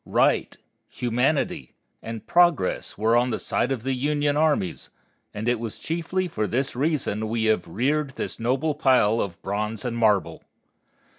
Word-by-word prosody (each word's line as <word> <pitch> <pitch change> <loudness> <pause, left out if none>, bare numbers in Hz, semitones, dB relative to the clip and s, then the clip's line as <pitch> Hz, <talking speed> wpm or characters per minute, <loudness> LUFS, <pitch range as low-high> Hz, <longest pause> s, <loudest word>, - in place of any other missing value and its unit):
Right, - - +1 0.3
humanity, 125 - -1 0.3
and 115 -1 -7
progress 175 - +2
were 110 +3 +2
on 120 +1 +3
the 120 - -1
side 125 - -1
of 125 -4 -2
the 135 +1 0
Union 145 +2 0
armies, 150 - 0 0.4
and 105 +3 -5
it 120 -1 +2
was 115 -2 -5
chiefly 170 +3 -2
for 110 -10 -2
this 135 +2 -1
reason 130 -7 -1
we 115 0 -1
have 110 -6 +1
reared 135 - -1
this - - -5
noble 130 +7 0
pile 130 -7 +3
of 90 -4 -4
bronze 105 +4 -3
and 120 -1 -2
marble. 110 -4 +1
125 Hz, 155 wpm, -24 LUFS, 110-145 Hz, 0.4 s, on